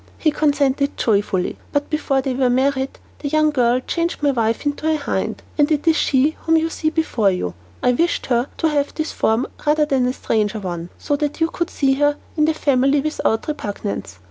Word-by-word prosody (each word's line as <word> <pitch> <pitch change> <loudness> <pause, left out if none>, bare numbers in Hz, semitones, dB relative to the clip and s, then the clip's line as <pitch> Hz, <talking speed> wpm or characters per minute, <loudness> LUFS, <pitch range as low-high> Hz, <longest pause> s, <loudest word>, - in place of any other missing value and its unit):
He 310 - +2
consented 285 -2 +1
joyfully, 200 -4 0
but 285 +1 -1
before 275 -3 0
they 265 - -1
were 255 0 +2
married, 265 +1 +1 0.2
the 290 - -4
young 310 +1 +3
girl 250 -3 +2
changed 335 +3 -2
my 285 - +4
wife 230 0 0
into 290 +2 -1
a - - +2
hind, 285 - -3 0.2
and 295 +1 +4
it 300 +1 0
is 325 - +5
she 285 +1 +2
whom 325 0 +3
you 325 +1 0
see 310 - 0
before 310 -10 +1
you. 135 - -2 0.3
I 250 - +4
wished 335 +8 0
her 245 0 +1
to 325 - +1
have 290 -1 -1
this 315 0 -2
form 225 +3 +1 0.2
rather 300 0 +3
than 265 -4 +1
a 250 - 0
stranger 215 -3 -1
one, 175 -3 -5
so 290 - -1
that 295 +1 -2
we 325 - +3
could 340 0 -2
see 270 -2 +1
her 290 0 +3 0.2
in 305 -2 +3
the 315 0 +1
family 275 -1 +2
without 275 -7 -1
repugnance. 205 - -4
280 Hz, 205 wpm, -20 LUFS, 245-305 Hz, 0.3 s, is